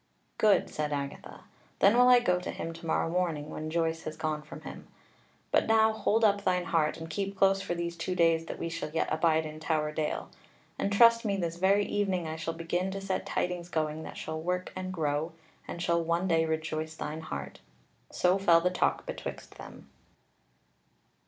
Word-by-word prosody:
"Good," 210 Hz, -2 st, +4 dB
said 150 Hz, -1 st, -2 dB
Agatha; 140 Hz, -1 st, -5 dB, 0.4 s
"then 200 Hz, +4 st, +5 dB
will 250 Hz, +1 st, +6 dB
I 250 Hz, -1 st, +8 dB
go 180 Hz, -6 st, +2 dB
to 180 Hz, -, -6 dB
him 165 Hz, -, -5 dB
to 165 Hz, 0 st, -9 dB
morrow 160 Hz, -, +1 dB
morning, 165 Hz, -4 st, -1 dB
when 155 Hz, 0 st, -5 dB
Joyce 165 Hz, 0 st, 0 dB
has 155 Hz, 0 st, -5 dB
gone 155 Hz, -1 st, -2 dB
from 150 Hz, -, -11 dB
him. -, -, -9 dB, 0.6 s
But -, -, +3 dB
now 220 Hz, 0 st, +4 dB
hold 220 Hz, +1 st, +1 dB
up 200 Hz, -1 st, +3 dB
thine 180 Hz, -2 st, +1 dB
heart, 155 Hz, -3 st, +1 dB
and 165 Hz, 0 st, -7 dB
keep 195 Hz, +4 st, -3 dB
close 195 Hz, 0 st, +4 dB
for 175 Hz, -, -3 dB
these 170 Hz, 0 st, -3 dB
two 180 Hz, +2 st, -3 dB
days 165 Hz, -1 st, +3 dB
that -, -, -5 dB
we -, -, -3 dB
shall 165 Hz, -1 st, -4 dB
yet 160 Hz, +1 st, -1 dB
abide 160 Hz, 0 st, +2 dB
in 155 Hz, 0 st, -7 dB
Tower 155 Hz, -1 st, 0 dB
Dale: 155 Hz, 0 st, -3 dB, 0.5 s
and 200 Hz, -, 0 dB
trust 230 Hz, +3 st, +6 dB
me 200 Hz, -3 st, 0 dB
this 170 Hz, -2 st, -2 dB
very 195 Hz, +3 st, +3 dB
evening 190 Hz, -5 st, -1 dB
I 160 Hz, -, -4 dB
shall 160 Hz, +1 st, -4 dB
begin 175 Hz, +3 st, -1 dB
to 195 Hz, +1 st, -4 dB
set 195 Hz, -1 st, -3 dB
tidings 175 Hz, -1 st, -2 dB
going 155 Hz, -1 st, -1 dB
that -, -, -8 dB
shall 160 Hz, 0 st, -4 dB
work 180 Hz, +2 st, -2 dB
and 185 Hz, 0 st, -4 dB
grow, 155 Hz, -1 st, -1 dB, 0.3 s
and -, -, -6 dB
shall 170 Hz, -1 st, +2 dB
one 170 Hz, +3 st, 0 dB
day 165 Hz, -2 st, +3 dB
rejoice 160 Hz, 0 st, -3 dB
thine 160 Hz, 0 st, -5 dB
heart." 70 Hz, -, -6 dB, 0.5 s
So 180 Hz, +2 st, +2 dB
fell 170 Hz, -4 st, +5 dB
the 180 Hz, +1 st, +1 dB
talk 180 Hz, -, 0 dB
betwixt -, -, -7 dB
them. -, -, -11 dB
170 Hz, 195 wpm, -29 LUFS, 160-190 Hz, 0.6 s, I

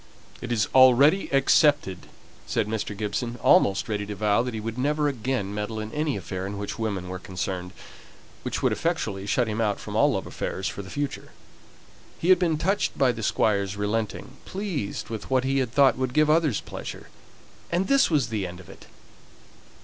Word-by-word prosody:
"It 125 Hz, -, -5 dB
is 110 Hz, -3 st, +1 dB
already 130 Hz, +8 st, +6 dB
accepted," 135 Hz, -, +3 dB, 0.4 s
said 115 Hz, -, 0 dB
Mr. 105 Hz, -2 st, -3 dB
Gibson, 115 Hz, +3 st, -3 dB
almost 95 Hz, 0 st, +4 dB
ready 105 Hz, -1 st, -2 dB
to 105 Hz, -, -5 dB
vow 105 Hz, +2 st, +2 dB
that 125 Hz, -1 st, -4 dB
he -, -, -3 dB
would 110 Hz, +1 st, -4 dB
never 150 Hz, +3 st, +1 dB
again 125 Hz, -6 st, -2 dB
meddle 105 Hz, +1 st, -3 dB
in 110 Hz, 0 st, -5 dB
any 150 Hz, -2 st, -1 dB
affair 95 Hz, +1 st, -5 dB
in 100 Hz, 0 st, -5 dB
which 100 Hz, +3 st, -5 dB
women 100 Hz, -5 st, -2 dB
were 90 Hz, 0 st, -5 dB
concerned, 90 Hz, -1 st, -4 dB, 0.7 s
which -, -, -4 dB
would -, -, +3 dB
effectually 95 Hz, 0 st, -2 dB
shut 120 Hz, +3 st, +1 dB
him 110 Hz, +1 st, -2 dB
out 105 Hz, -2 st, 0 dB
from -, -, -7 dB
all -, -, +4 dB
love -, -, -2 dB
affairs 95 Hz, 0 st, -4 dB
for -, -, -5 dB
the 95 Hz, -, -11 dB
future. 145 Hz, +3 st, -4 dB, 0.9 s
He 170 Hz, -, -1 dB
had 185 Hz, -1 st, +7 dB
been 165 Hz, -4 st, +1 dB
touched 195 Hz, +6 st, 0 dB
by 130 Hz, -2 st, +4 dB
the 115 Hz, -2 st, -6 dB
Squire's 100 Hz, -2 st, +1 dB
relenting, 110 Hz, +5 st, -3 dB
pleased 185 Hz, -, -4 dB
with 110 Hz, -2 st, -6 dB
what 130 Hz, -1 st, +2 dB
he 135 Hz, +1 st, +1 dB
had 125 Hz, -4 st, -1 dB
thought 135 Hz, -1 st, +4 dB
would 130 Hz, -1 st, -2 dB
give 155 Hz, 0 st, +4 dB
others 155 Hz, -8 st, +2 dB
pleasure, -, -, -8 dB, 0.6 s
and 180 Hz, +3 st, +1 dB
this 275 Hz, 0 st, +4 dB
was 145 Hz, -9 st, +1 dB
the 105 Hz, -4 st, -2 dB
end 90 Hz, +1 st, -9 dB
of 95 Hz, -, -14 dB
it! -, -, -15 dB
115 Hz, 190 wpm, -25 LUFS, 100-140 Hz, 0.9 s, had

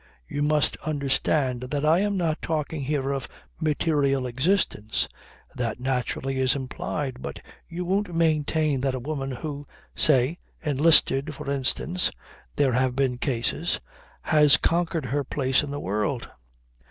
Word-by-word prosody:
You 145 Hz, -, -3 dB
must 150 Hz, 0 st, +2 dB
understand 140 Hz, -3 st, 0 dB
that 145 Hz, +1 st, -1 dB
I 160 Hz, +3 st, +5 dB
am 205 Hz, 0 st, 0 dB
not 165 Hz, -3 st, 0 dB
talking 155 Hz, -1 st, -2 dB
here 140 Hz, 0 st, -1 dB
of 135 Hz, -2 st, -3 dB, 0.3 s
material 145 Hz, -4 st, +1 dB
existence. 130 Hz, -, 0 dB, 0.5 s
That 120 Hz, -1 st, -3 dB
naturally 130 Hz, +1 st, -2 dB
is 130 Hz, 0 st, +3 dB
implied; 130 Hz, 0 st, -4 dB
but -, -, -6 dB, 0.3 s
you 175 Hz, +1 st, -4 dB
won't 190 Hz, -1 st, 0 dB
maintain 155 Hz, -3 st, +2 dB
that 135 Hz, -1 st, 0 dB
a -, -, -3 dB
woman 135 Hz, +1 st, -3 dB
who, 145 Hz, +2 st, -6 dB, 0.3 s
say, 145 Hz, +2 st, +4 dB, 0.2 s
enlisted, 150 Hz, -1 st, +3 dB
for 140 Hz, -1 st, -5 dB
instance 140 Hz, +6 st, 0 dB, 0.5 s
(there 140 Hz, -3 st, +2 dB
have 125 Hz, 0 st, +1 dB
been 130 Hz, -2 st, 0 dB
cases) 120 Hz, -4 st, -1 dB, 0.4 s
has 150 Hz, -3 st, +6 dB
conquered 165 Hz, -3 st, 0 dB
her 140 Hz, +4 st, -1 dB
place 130 Hz, -1 st, +1 dB
in 145 Hz, -, -5 dB
the 145 Hz, +1 st, -4 dB
world. 105 Hz, +5 st, -2 dB
140 Hz, 140 wpm, -25 LUFS, 130-155 Hz, 0.5 s, has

